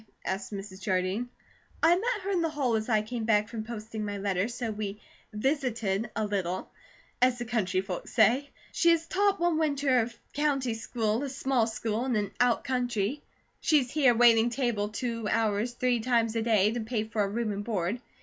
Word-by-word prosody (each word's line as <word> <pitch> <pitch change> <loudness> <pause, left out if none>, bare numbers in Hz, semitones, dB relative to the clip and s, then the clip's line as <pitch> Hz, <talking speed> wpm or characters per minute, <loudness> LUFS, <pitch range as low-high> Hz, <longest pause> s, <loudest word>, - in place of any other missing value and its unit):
asked 190 +1 -3
Mrs. 195 -1 -7
Jardine. 185 +5 -1 0.5
"I 330 +1 +7
met 450 +3 -1
her 395 - -2
in 365 -3 +1
the 330 - +1
hall 280 -6 0
as 220 +2 -2
I 215 -2 +3
came 230 +1 -4
back 210 -1 +3
from 225 -2 -5
posting 220 -1 -6
my 205 -1 -3
letter, 195 0 0
so 235 -1 -4
we 210 -1 -4 0.3
'visited' 225 -4 -1
a 220 - 0
little, 190 -3 -2 0.5
as 250 -1 +4
the 240 - -4
country 200 -5 0
folks 190 -2 -6
say. 245 +6 +3 0.2
She 340 - +3
has 330 -1 +3
taught 400 +2 +1
one 340 -2 +2
winter 280 -4 +2
of 235 0 -2 0.2
country 275 -5 0
school, 225 0 -1
a 280 - -3
small 260 -3 +1
school 225 0 -2
in 255 -3 0
an 205 -2 -1
out 245 -1 +3
county. 250 -1 -1 0.4
She's 280 -6 +2
here 265 -6 +4
waiting 230 0 +6
table 235 -5 -1
two 230 0 -3
hours 225 +1 +1
three 245 0 +1
times 230 -1 +1
a 225 - +1
day, 215 -2 +3
to 240 - -3
pay 220 -1 -2
for 220 -1 -2
her 200 - +1
room 225 +1 -1
and 205 0 -4
board. 210 +1 -2
230 Hz, 195 wpm, -28 LUFS, 210-255 Hz, 0.5 s, I